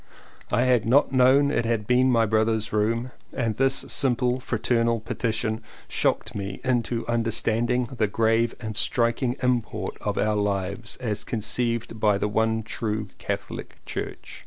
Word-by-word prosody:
I 115 +4 +3
had 125 -4 +3
not 130 +4 +4
known 135 +2 +5
it 115 - +1
had 115 -2 -1
been 125 +3 +4
my 115 -2 +4
brother's 110 0 +1
room 115 +4 0 0.2
and 115 -4 -1
this 135 0 +2
simple 125 -1 +2
fraternal 115 -1 0
petition 110 0 -2 0.3
shocked - - 0
me 100 -1 -5
into 120 -2 0
under 115 -1 0
standing 120 +3 +1
the 115 -2 -1
grave 115 +2 +1
and 110 -3 -5
striking 120 +3 +1
import 125 -3 -1
of - - -2
our 105 0 +2
lives 100 +2 -2
as 110 -5 -3
conceived 115 +1 -2
by 105 -2 +3
the 105 - 0
one 110 +1 +1
true 110 -1 -3
Catholic - - -5
Church. - - -6
115 Hz, 150 wpm, -25 LUFS, 110-125 Hz, 0.3 s, known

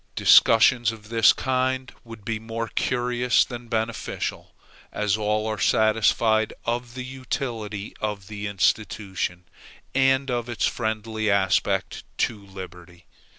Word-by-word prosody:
Discussions 115 +1 +5
of 110 -2 -12
this 115 -1 +6
kind 130 0 -1
would 115 -4 -12
be 110 0 -2
more 115 +1 -5
curious 125 0 +1
than 120 -1 -8
beneficial, 115 0 -3 0.4
as 105 -1 0
all 105 0 0
are 110 -2 -3
satisfied 110 +2 +2
of 120 +1 -3
the 125 -1 -5
utility 120 -6 -5
of 105 -3 -3
the 105 0 -5
institution, 95 -2 -1 0.5
and 135 0 +2
of 120 -1 -2
its 120 - 0
friendly 110 -1 -2
aspect 100 -1 +1
to 110 -4 -1
liberty. 90 -2 -11
110 Hz, 120 wpm, -24 LUFS, 105-120 Hz, 0.5 s, this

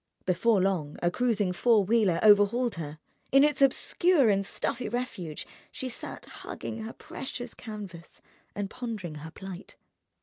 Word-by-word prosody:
Before 200 +4 +3
long 180 -6 0
a 175 - +3
cruising 210 -5 +1
four 220 +2 +4
wheeler 205 -5 +3
overhauled 215 +3 +5
her. 155 -4 -6 0.3
In 275 +1 +7
its 295 -2 +2
obscure 275 +1 +4
and 195 0 +2
stuffy 235 +4 -2
refuge 205 - -4 0.3
she 260 - -5
sat 235 - -6
hugging 225 - -7
her 220 +1 -6
precious 265 -6 -7
canvas 200 -7 -9 0.4
and 205 -1 -2
pondering 210 -9 -5
her 160 - -7
plight. 190 +2 -9
210 Hz, 140 wpm, -29 LUFS, 185-245 Hz, 0.4 s, In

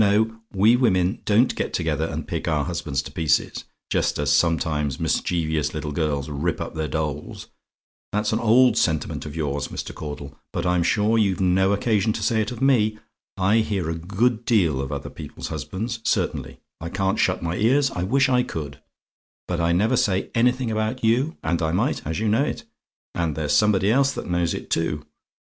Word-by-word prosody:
No, 110 +2 +2
we 105 +5 +4
women 95 -7 +2
don't 110 +5 +3
get - - -3
together, 80 -2 0
and 80 -1 -5
pick - - -3
our 75 -2 +1
husbands 75 -6 -2
to - - -9
pieces, 80 -5 0 0.3
just - - +1
as - - +2
sometimes 75 -4 +1
mischievous 80 -3 0
little 75 - -3
girls 75 -2 -1
rip 75 +3 -2
up - - -5
their 80 -1 -2
dolls. 75 0 -4 0.6
That's 105 +1 0
an - - +1
old 120 +3 +4
sentiment 80 -2 -1
of 75 - -8
yours, 75 -3 -2
Mr. - - -6
Caudle; 75 -2 -7 0.2
but - - -3
I'm 90 0 +2
sure 105 +6 +2
you've 100 -3 +1
no 95 +1 +3
occasion 105 0 +1
to - - -4
say 110 -1 +2
it 110 - -2
of 125 +1 -5
me. 110 -6 +3 0.4
I 95 +4 +3
hear 100 -7 0
a - - -2
good 105 +8 0
deal 90 - +2
of 70 +1 -5
other 70 -1 -5
people's - - -8
husbands, 115 +4 -4
certainly; - - -1 0.2
I 85 - -5
can't 95 +1 -1
shut - - +1
my 85 +1 -2
ears; 135 +6 +3
I 90 - -4
wish 135 +9 +2
I 125 -1 +3
could: 75 - -6 0.7
but 90 -1 -2
I 85 0 +2
never 100 +6 +2
say 95 -2 0
anything 125 0 +2
about 110 +3 -2
you, 125 +8 +2
and 85 +2 0
I 80 -1 0
might, 90 - 0
and 80 - -2
you 110 +1 -1
know 110 +6 +3
it - - -3 0.5
and 85 -4 -1
there's 75 -2 -1
somebody 100 +4 +3
else 135 +3 +3
that - - -5
knows 85 -1 0
it, - - -8
too. 75 -2 -1
95 Hz, 195 wpm, -23 LUFS, 80-110 Hz, 0.7 s, we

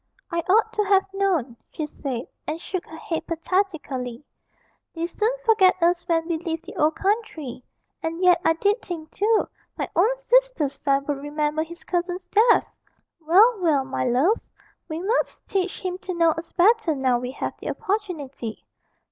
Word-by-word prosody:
'I 340 - 0
ought 445 +3 +4
to 425 - +1
have 390 -1 +3
known,' 355 -12 0 0.2
she 310 - -3
said, 265 -5 -5 0.2
and 310 +2 -2
shook 360 +1 -5
her 320 - -10
head 325 0 -4
pathetically; 320 -8 -2 0.7
'they 330 0 -1
soon 425 +5 0 0.2
forget 390 -5 +5
us 345 0 +2
when 330 -1 +1
we 335 -2 -1
leave 330 -1 -4
the 350 - -10
old 310 +1 +2
country 335 - -2 0.4
and 325 +1 -3
yet 360 -1 +5
I 325 - +4
did 405 +7 +1
think, 320 -3 -7
too, 430 +2 +2 0.3
my - - -2
own 445 +8 +3
sister's - - +2
son 275 -1 0
would 290 -1 -1
remember 300 +1 -1
his 340 +2 -7
cousin's 360 +1 -2
death! 440 +5 +4 0.5
Well, 395 +8 +5
well, 305 -7 +2
my 265 - -2
loves, 270 - +2 0.5
we 315 +1 -3
must 425 +8 0
teach 385 -3 -1
him 365 -1 -3
to 365 -1 -5
know 335 -1 +4
us 325 +1 -6
better 380 -3 +4
now 260 -3 +2
we 250 0 -4
have - - -3
the - - -5
opportunity. 315 - -4
340 Hz, 170 wpm, -24 LUFS, 305-390 Hz, 0.7 s, forget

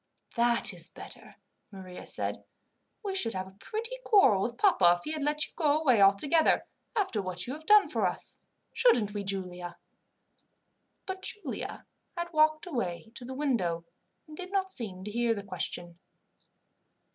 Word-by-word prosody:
"That 235 -2 +3
is 175 0 -3
better," - - -12 0.3
Maria 185 -3 -10
said. - - -3 0.6
"We 400 -2 -2
should 230 - 0
have 185 0 -3
a 190 0 -15
pretty 460 - -4
quarrel 390 - +5
with 235 +3 -2
papa 185 - +5
if 175 - -15
he 305 - -4
had 310 -1 -3
let 300 +1 0
you - - -17
go 300 -3 +2
away 255 -9 +4
altogether, 240 +12 +4 0.3
after 375 - 0
what 180 -1 -3
you 255 - -4
have 315 +2 -10
done 420 -1 +7
for - - 0
us - - -3 0.3
"Shouldn't 225 - +3
we, 205 -1 -3
Giulia?" 180 -3 -4 1.3
But 380 0 -5
Giulia 405 +2 -4 0.3
had 345 0 -4
walked 310 0 +3
away 225 - -4
to 245 - -10
the 260 +2 -7
window, 190 - -1 0.4
and 310 - -11
did 365 +3 -8
not 380 -1 0
seem 195 - 0
to 210 - -6
hear 235 0 +1
the 200 - -6
question. 175 -2 -6
240 Hz, 165 wpm, -29 LUFS, 190-320 Hz, 1.3 s, done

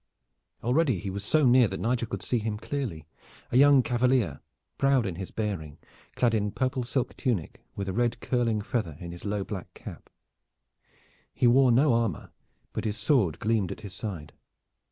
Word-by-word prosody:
Already 130 - +2
he 95 +2 -5
was 100 +1 -5
so 155 +7 +3
near 125 -1 +6
that 95 0 -5
Nigel 120 0 0
could - - -5
see 120 - 0
him 110 -1 -3
clearly, 110 - -4 0.5
a 120 - +3
young 140 -1 +7
cavalier, 120 - +1 0.4
proud 135 -4 +3
in 95 - -2
his 95 +2 -6
bearing, 90 -9 -4 0.4
clad 120 -2 +2
in 105 -2 +1
purple 130 +4 -1
silk 125 +1 -2
tunic 115 - -2
with 100 -1 -4
a 95 - -2
red 120 +1 0
curling 115 -4 0
feather 105 - -3
in 85 -1 -7
his 85 +3 -10
low 100 -1 -1
black 95 -2 -7
cap. - - -10 1.3
He - - +1
wore 125 +1 +6
no 130 +3 +4
armor, 115 -8 -1 0.4
but - - -3
his 105 0 -1
sword 105 - +2
gleamed 105 -4 0
at - - -7
his 100 -4 -8
side. 90 -7 -6
115 Hz, 175 wpm, -27 LUFS, 95-125 Hz, 1.3 s, young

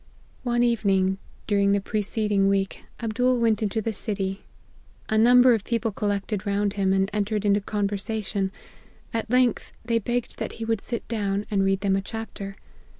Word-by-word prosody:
" - - -32
One 240 0 +3
evening, 195 -5 +2 0.3
during 200 -1 +3
the 200 - +3
preceding 210 -1 0
week, 195 -1 0 0.2
Ab 225 -2 -2
dool 250 +2 +2
went 225 -3 +2
into 215 +1 -1
the 225 - -1
city. 195 -2 -2 0.7
A 220 - +1
number 245 +3 +7
of 220 -3 0
people 230 -1 -1
col 205 +1 -2
lected 205 0 -2
round 200 -1 0
him, 195 -2 +1
and 195 0 +2
entered 210 0 -1
into 205 0 +3
conversation; 200 -1 -2 0.6
at 225 0 -2
length, 250 -1 +2
they 230 -1 +2
begged 240 +2 -3
that - - -3
he 225 - -5
would 225 -2 0
sit 235 -2 -5
down, 205 -3 -1
and 195 -2 +2
read 195 0 +1
them 195 -1 +2
a 195 - 0
chapter. 200 -2 -6
210 Hz, 180 wpm, -25 LUFS, 195-225 Hz, 0.7 s, number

